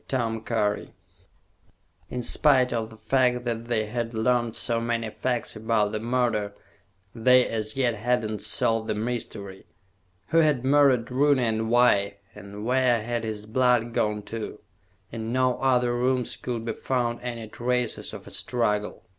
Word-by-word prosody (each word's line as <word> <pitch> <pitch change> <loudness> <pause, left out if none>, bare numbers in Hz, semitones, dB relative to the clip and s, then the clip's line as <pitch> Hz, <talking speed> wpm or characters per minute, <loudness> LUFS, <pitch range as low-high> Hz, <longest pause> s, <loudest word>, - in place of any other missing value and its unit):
In 125 -1 -4
spite 130 -1 +3
of 110 -2 -2
the 110 - -14
fact 125 +1 +1
that 115 -1 -2
they 115 -2 0
had 115 +1 -4
learned 120 0 +1
so 115 -2 0
many 115 -1 -2
facts 125 -1 -2
about 110 -1 +1
the 110 - -2
murder, 115 -3 0 0.6
they 125 +2 +4
as 110 -1 -3
yet 125 -3 +1
had 120 +1 0
not 105 -1 -5
solved 110 +1 +1
the - - -1
mystery. 105 -4 -5 0.6
Who 165 - +4
had 150 -6 +2
murdered 135 -4 +4
Rooney, 140 0 +3
and 110 -1 0
why? 100 -5 +3 0.2
And 100 +2 -9
where 125 -2 +2
had 120 0 -2
his 105 -1 -4
blood 120 0 +2
gone 105 -1 0
to? 110 +1 -6 0.5
In 115 0 -5
no 130 0 +1
other 125 -2 +2
rooms 125 0 0
could 120 -2 -5
be 115 - -2
found 120 -2 -1
any 120 -2 -5
traces 125 +1 -2
of - - -9
a - - -11
struggle. 105 -4 -1
120 Hz, 150 wpm, -26 LUFS, 110-125 Hz, 0.6 s, they